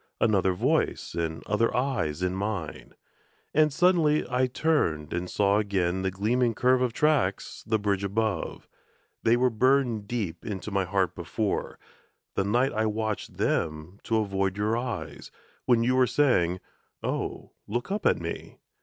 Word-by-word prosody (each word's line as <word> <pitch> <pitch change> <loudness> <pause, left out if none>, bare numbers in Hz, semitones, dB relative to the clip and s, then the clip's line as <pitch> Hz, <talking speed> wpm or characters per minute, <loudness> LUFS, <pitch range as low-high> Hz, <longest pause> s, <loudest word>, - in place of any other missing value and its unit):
Another 95 -4 +3
voice 90 - 0
and 80 -1 -3
other 105 +3 +1
eyes 90 - -1
in 90 0 0
mine! 95 -7 -4 0.6
And 155 0 +4
suddenly 160 -1 +3
I 130 +1 +1
turned 120 - 0
and 90 +1 -3
saw 100 0 +2
again 95 -3 0
The 95 - 0
gleaming 115 +5 +1
curve 125 +2 +3
of 125 -2 +1
tracks, 150 +3 0
the 110 0 +2
bridge 100 -2 -1
above 100 -2 -2 0.5
They 115 +1 +4
were 125 0 +2
burned 120 -2 +2
deep 100 -8 -3
into 105 -1 -5
my 100 -1 +1
heart 95 -2 0
before, - - -3 0.6
The 100 - 0
night 120 +7 +1
I 110 +1 +1
watched 110 0 -3
them 80 +5 -1
to 115 - +1
avoid 95 -2 0
your 105 +2 +1
eyes, 120 0 -5 0.4
When 120 -2 +4
you 125 +2 +2
were 130 -1 +4
saying, 95 -13 +2 0.4
"Oh, - - -3 0.2
look 120 - -3
up 210 +1 0
at - - +3
me!" - - -6
105 Hz, 155 wpm, -27 LUFS, 95-125 Hz, 0.6 s, And